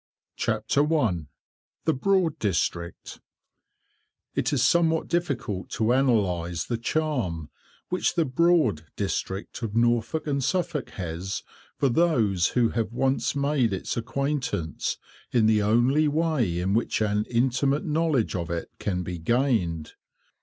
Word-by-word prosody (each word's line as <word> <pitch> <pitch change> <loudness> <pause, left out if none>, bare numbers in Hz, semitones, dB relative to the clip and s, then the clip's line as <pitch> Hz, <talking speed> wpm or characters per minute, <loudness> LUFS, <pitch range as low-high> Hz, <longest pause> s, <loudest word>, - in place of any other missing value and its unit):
[Picture: - - -1
Decorative 145 +2 +3 1.0
drop 180 +2 +2 0.2
capital] 85 0 -2 1.4
It 135 - 0
is 135 -4 +2
somewhat 165 -2 +3
difficult 135 - -2
to 110 +1 0
analyse 95 -11 +1
the 120 -2 -2
charm 115 - -1 0.4
which 180 0 0
the 165 -2 +2
"Broad" 130 - +2
District 100 +2 -3
of 110 -2 -4
Norfolk 120 +5 +1
and 140 -2 -1
Suffolk 175 0 -1
has 90 +2 -4 0.3
for 140 - +2
those 115 - +2
who 120 -2 +4
have 115 -2 -2
once 130 +3 0
made 140 -5 +1
its 95 - -3
acquaintance 125 - -2 0.3
in 115 -3 +3
the 110 -1 +4
only 120 +9 +3
way 150 - +1
in 95 +2 0
which 115 - +1
an 105 0 +1
intimate 130 +4 +1
knowledge 155 -8 +1
of 85 -3 -3
it 85 -1 -4
can 90 -3 -2
be 90 0 -5
gained. 90 - 0
120 Hz, 125 wpm, -26 LUFS, 95-145 Hz, 1.4 s, who